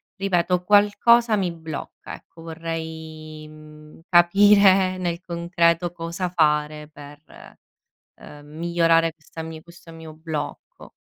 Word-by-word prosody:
ripeto, 180 Hz, -2 st, 0 dB
qualcosa 210 Hz, +3 st, +4 dB
mi 180 Hz, -3 st, -1 dB
blocca, 160 Hz, -3 st, -9 dB
ecco. 165 Hz, -, -17 dB
Vorrei, 160 Hz, -1 st, -7 dB
uhm, 155 Hz, 0 st, -16 dB
capire 190 Hz, +1 st, +5 dB
nel 175 Hz, -2 st, -3 dB
concreto 170 Hz, -1 st, 0 dB
cosa 170 Hz, +1 st, -5 dB
fare 150 Hz, -2 st, 0 dB
per, 145 Hz, 0 st, -14 dB, 1.0 s
ehm, 145 Hz, 0 st, -14 dB
migliorare 165 Hz, -1 st, +2 dB
questa 160 Hz, +1 st, -13 dB
mia 160 Hz, -1 st, -9 dB
questo 170 Hz, -1 st, -16 dB
mio 160 Hz, -1 st, -11 dB
blocco. 160 Hz, -2 st, -7 dB
165 Hz, 110 wpm, -22 LUFS, 155-180 Hz, 1.0 s, capire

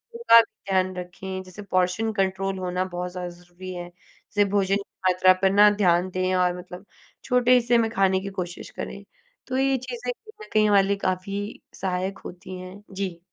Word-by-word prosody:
भी 465 Hz, -, -7 dB
ध्यान 195 Hz, -5 st, +4 dB
रखें। 185 Hz, +1 st, -6 dB
जैसे 185 Hz, +3 st, -11 dB
पोर्शन 185 Hz, +3 st, 0 dB
कंट्रोल 195 Hz, -1 st, -1 dB
होना 180 Hz, 0 st, -1 dB
बहुत 180 Hz, 0 st, -5 dB
ज़्यादा 180 Hz, -1 st, -5 dB
ज़रूरी 175 Hz, +1 st, -10 dB
है। 175 Hz, 0 st, -6 dB
जैसे 200 Hz, +3 st, -3 dB
भोजन 195 Hz, -1 st, +2 dB
की 200 Hz, -, -1 dB, 0.3 s
मात्रा 185 Hz, +1 st, +5 dB
पर 190 Hz, -, +4 dB
ना, 205 Hz, +1 st, +7 dB
ध्यान 185 Hz, -3 st, +2 dB
दें 185 Hz, 0 st, 0 dB
और 180 Hz, -1 st, +2 dB
मतलब 180 Hz, +2 st, -10 dB, 0.4 s
छोटे 250 Hz, -1 st, +3 dB
हिस्से 240 Hz, 0 st, +3 dB
में 225 Hz, -1 st, +2 dB
खाने 190 Hz, -3 st, +2 dB
की 200 Hz, -, -5 dB
कोशिश 175 Hz, 0 st, -5 dB
करें। -, -, -6 dB, 0.4 s
तो 260 Hz, 0 st, -2 dB
ये 270 Hz, 0 st, +2 dB
चीज़ें 250 Hz, -1 st, -5 dB
कहीं 435 Hz, -, -14 dB
न -, -, -20 dB
कहीं, 215 Hz, -, +5 dB
ये 210 Hz, -, +3 dB
वाली 200 Hz, 0 st, +4 dB
काफ़ी 195 Hz, +3 st, -3 dB, 0.2 s
सहायक 190 Hz, +1 st, -2 dB
होती 185 Hz, +1 st, -8 dB
हैं। 185 Hz, +3 st, -10 dB
जी। 190 Hz, -3 st, -4 dB
190 Hz, 185 wpm, -25 LUFS, 180-210 Hz, 0.4 s, ना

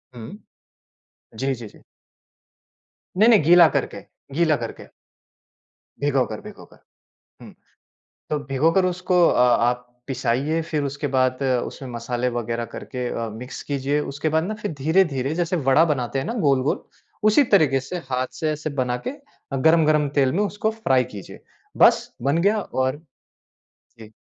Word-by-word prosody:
हुँ। 120 Hz, -, -9 dB, 1.0 s
जी, 135 Hz, +3 st, -1 dB
जी, 115 Hz, -2 st, -9 dB
जी। -, -, -17 dB, 1.4 s
नहीं-नहीं 215 Hz, -2 st, +6 dB
गीला 170 Hz, +2 st, +7 dB
करके, -, -, -4 dB, 0.3 s
गीला 160 Hz, -2 st, +3 dB
करके। -, -, -10 dB, 1.1 s
भिगो 140 Hz, -3 st, +2 dB
कर, 110 Hz, -2 st, -7 dB
भिगो -, -, -12 dB
कर। -, -, -22 dB, 0.6 s
हुँ। -, -, -12 dB, 0.8 s
तो 150 Hz, -, -1 dB
भिगोकर 160 Hz, +8 st, +2 dB
उसको 180 Hz, -1 st, +2 dB
अ, -, -, +1 dB
आप 125 Hz, 0 st, +2 dB, 0.2 s
पिसाइए 135 Hz, +5 st, -1 dB
फिर 150 Hz, -2 st, -1 dB
उसके 140 Hz, +1 st, -3 dB
बाद 130 Hz, +1 st, +1 dB, 0.2 s
उसमें 135 Hz, -, -9 dB
मसाले 120 Hz, +1 st, -2 dB
वगैरह 115 Hz, 0 st, -3 dB
करके 125 Hz, -2 st, -5 dB
अ, 115 Hz, -1 st, -3 dB
मिक्स 120 Hz, +4 st, -8 dB
कीजिए। 140 Hz, +1 st, -1 dB
उसके 145 Hz, +3 st, -2 dB
बाद 160 Hz, +1 st, +1 dB
ना 205 Hz, +5 st, -3 dB
फिर 205 Hz, -, -3 dB
धीरे-धीरे 155 Hz, -4 st, +1 dB
जैसे 175 Hz, +1 st, -1 dB
वड़ा 155 Hz, +5 st, +5 dB
बनाते 130 Hz, 0 st, -3 dB
हैं 135 Hz, -, -4 dB
ना 230 Hz, -, -3 dB
गोल-गोल, 135 Hz, 0 st, +1 dB, 0.4 s
उसी 215 Hz, +7 st, +5 dB
तरीके 140 Hz, -7 st, +3 dB
से 180 Hz, -, -3 dB
हाथ 130 Hz, 0 st, -1 dB
से 155 Hz, -2 st, 0 dB
एसे 155 Hz, +1 st, -4 dB
बना 125 Hz, -1 st, -1 dB
के -, -, -1 dB
अ, 280 Hz, -, -10 dB
गरम-गरम 155 Hz, 0 st, +3 dB
तेल 135 Hz, -2 st, +3 dB
में 200 Hz, +5 st, +1 dB
उसको 210 Hz, +2 st, -2 dB
फ्राई 135 Hz, -13 st, +1 dB
कीजिए। 100 Hz, -, -10 dB, 0.4 s
बस -, -, +4 dB
बन 140 Hz, +5 st, +1 dB
गया 205 Hz, +4 st, +2 dB
और 130 Hz, -3 st, -2 dB, 1.0 s
जी। 110 Hz, -1 st, -13 dB
140 Hz, 150 wpm, -22 LUFS, 125-165 Hz, 1.4 s, गीला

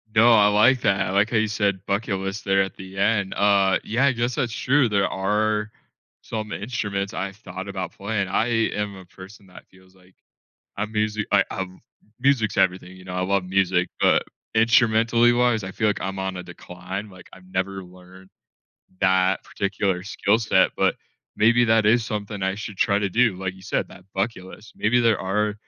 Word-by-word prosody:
No, 115 Hz, +2 st, +6 dB
I 105 Hz, -2 st, +6 dB
like 120 Hz, +5 st, +4 dB
that, 95 Hz, -1 st, +2 dB
I -, -, -3 dB
like 100 Hz, +3 st, +2 dB
how 115 Hz, -, +2 dB
you 110 Hz, 0 st, +2 dB
said 100 Hz, -3 st, -1 dB
"bucket 100 Hz, -1 st, -1 dB
list" 95 Hz, +1 st, -5 dB
there 95 Hz, 0 st, +3 dB
at 95 Hz, -, -3 dB
the 95 Hz, 0 st, -11 dB
end. 100 Hz, -1 st, +1 dB
Uh, 100 Hz, -2 st, +3 dB
yeah, 120 Hz, +5 st, +1 dB
I 140 Hz, -, +4 dB
guess 120 Hz, 0 st, -2 dB
that's 120 Hz, -6 st, -1 dB
true, 135 Hz, 0 st, +2 dB
there 100 Hz, -2 st, +2 dB
are 105 Hz, +2 st, -1 dB, 0.5 s
some 110 Hz, -1 st, -5 dB
instruments 105 Hz, -2 st, -3 dB
I 95 Hz, +1 st, -3 dB
thought 95 Hz, -1 st, -9 dB
about 95 Hz, -3 st, -5 dB
playing. 100 Hz, -1 st, -2 dB
I 105 Hz, +4 st, 0 dB, 0.3 s
am 105 Hz, -1 st, -3 dB
a 95 Hz, -1 st, -12 dB
person 95 Hz, +3 st, -14 dB
that 90 Hz, -, -15 dB
feels 95 Hz, 0 st, -22 dB
like 95 Hz, 0 st, -23 dB, 0.6 s
I 105 Hz, -, -1 dB
musi 105 Hz, 0 st, -1 dB
I 100 Hz, -2 st, +5 dB
I've 95 Hz, -1 st, -3 dB, 0.5 s
Music's 125 Hz, -5 st, +1 dB
everything, 95 Hz, -1 st, 0 dB
you 95 Hz, -, -14 dB
know? 90 Hz, 0 st, -8 dB
I 90 Hz, -, -1 dB
love 100 Hz, +1 st, 0 dB
music, 90 Hz, -1 st, +1 dB
but -, -, +3 dB, 0.3 s
instrumentally 115 Hz, +1 st, +4 dB
wise, 120 Hz, -3 st, +2 dB
I 95 Hz, -, -6 dB
feel 110 Hz, +3 st, 0 dB
like 105 Hz, -, -1 dB
I'm 95 Hz, +1 st, -4 dB
on 95 Hz, -1 st, -3 dB
a 90 Hz, -, -6 dB
decline, 95 Hz, +5 st, -8 dB
like, 95 Hz, -1 st, -15 dB
I've 95 Hz, 0 st, -15 dB
never 95 Hz, +1 st, -2 dB
learned 90 Hz, +1 st, -16 dB, 0.7 s
that 95 Hz, 0 st, +2 dB
particular 100 Hz, -2 st, -2 dB
skill 105 Hz, +2 st, +1 dB
set, 105 Hz, -4 st, +3 dB
but -, -, +1 dB, 0.4 s
maybe 115 Hz, +3 st, +4 dB
that 110 Hz, -1 st, +3 dB
is 115 Hz, +2 st, +4 dB
something 105 Hz, -2 st, -5 dB
I 95 Hz, 0 st, 0 dB
should 105 Hz, 0 st, -7 dB
try 100 Hz, -, +2 dB
to 100 Hz, -1 st, -1 dB
do, 115 Hz, +1 st, +3 dB
like 95 Hz, 0 st, -4 dB
you 95 Hz, -, -16 dB
said, -, -, -2 dB
that 90 Hz, -, -15 dB
bucket 95 Hz, -1 st, -2 dB
list, 105 Hz, +3 st, -13 dB
maybe 120 Hz, +3 st, +2 dB
there 115 Hz, -2 st, +3 dB
are 105 Hz, +2 st, -1 dB
100 Hz, 195 wpm, -23 LUFS, 95-110 Hz, 0.7 s, No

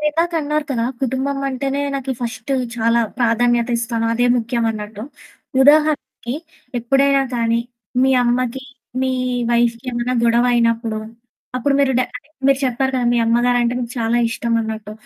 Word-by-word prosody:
మీరు 300 Hz, -, 0 dB
ఇందాక 335 Hz, +3 st, 0 dB
అన్నారు 300 Hz, 0 st, -1 dB
కదా! 235 Hz, -4 st, 0 dB, 0.2 s
కుటుంబం 265 Hz, +2 st, -1 dB
అంటేనే 275 Hz, +1 st, -2 dB
నాకి 270 Hz, -1 st, -2 dB
ఫస్ట్ 230 Hz, +1 st, -5 dB, 0.3 s
చాలా 230 Hz, +1 st, +2 dB, 0.2 s
ప్రాధాన్యత 240 Hz, 0 st, +2 dB
ఇస్తాను 230 Hz, -1 st, -1 dB
అదే 240 Hz, +2 st, +2 dB
ముఖ్యం 235 Hz, 0 st, -1 dB
అన్నట్టు, 210 Hz, -1 st, -6 dB, 0.6 s
ఉదాహరణకి 295 Hz, -4 st, +2 dB, 0.4 s
ఎప్పుడైనా 275 Hz, +3 st, +3 dB
కానీ 230 Hz, 0 st, +1 dB, 0.4 s
మీ 265 Hz, -, +4 dB
అమ్మకి 250 Hz, +2 st, 0 dB, 0.4 s
మీ 260 Hz, -, +1 dB, 0.4 s
వైఫ్‌కి 235 Hz, +1 st, +1 dB
ఏమైనా 240 Hz, +1 st, -1 dB
గొడవ 235 Hz, +1 st, +3 dB
అయినప్పుడు. 230 Hz, -1 st, +1 dB, 0.6 s
అప్పుడు 275 Hz, +3 st, +1 dB
మీరు 270 Hz, -1 st, +3 dB
డ -, -, +4 dB, 0.2 s
అంటే 280 Hz, -, -15 dB, 0.2 s
మీరు 275 Hz, -1 st, +4 dB
చెప్పారు 265 Hz, +1 st, 0 dB
కదా 250 Hz, -1 st, +1 dB
మీ 240 Hz, -, +2 dB
అమ్మగారంటే 240 Hz, +1 st, +2 dB
మీకు 240 Hz, -1 st, -4 dB
చాలా 230 Hz, +1 st, +1 dB
ఇష్టం 235 Hz, 0 st, -2 dB
అన్నట్టు. 220 Hz, -1 st, -5 dB
240 Hz, 145 wpm, -19 LUFS, 230-270 Hz, 0.6 s, మీ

